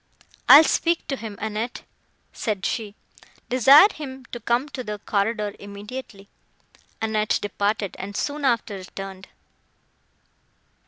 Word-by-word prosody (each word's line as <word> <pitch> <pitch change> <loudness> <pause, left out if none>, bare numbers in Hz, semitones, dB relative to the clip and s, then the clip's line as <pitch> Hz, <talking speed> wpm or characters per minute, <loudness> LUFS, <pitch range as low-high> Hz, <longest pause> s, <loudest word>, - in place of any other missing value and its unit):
"I - - +12
will 310 - +8
speak 335 +1 0
to 275 - 0
him, 220 -5 -8
Annette," 220 +3 -4 0.5
said 205 -3 -3
she; 210 -4 -3 0.5
"desire 265 - +8
him 265 -3 -8
to 240 - -5
come 235 +5 0
to 265 -2 -6
the 210 -2 -5
corridor 210 0 -1
immediately." 200 +1 -9 0.7
Annette 215 -1 0
departed, 205 0 -2
and 200 +2 -6
soon 295 0 -3
after 230 -6 0
returned. 190 +1 -9
220 Hz, 120 wpm, -23 LUFS, 205-255 Hz, 0.7 s, I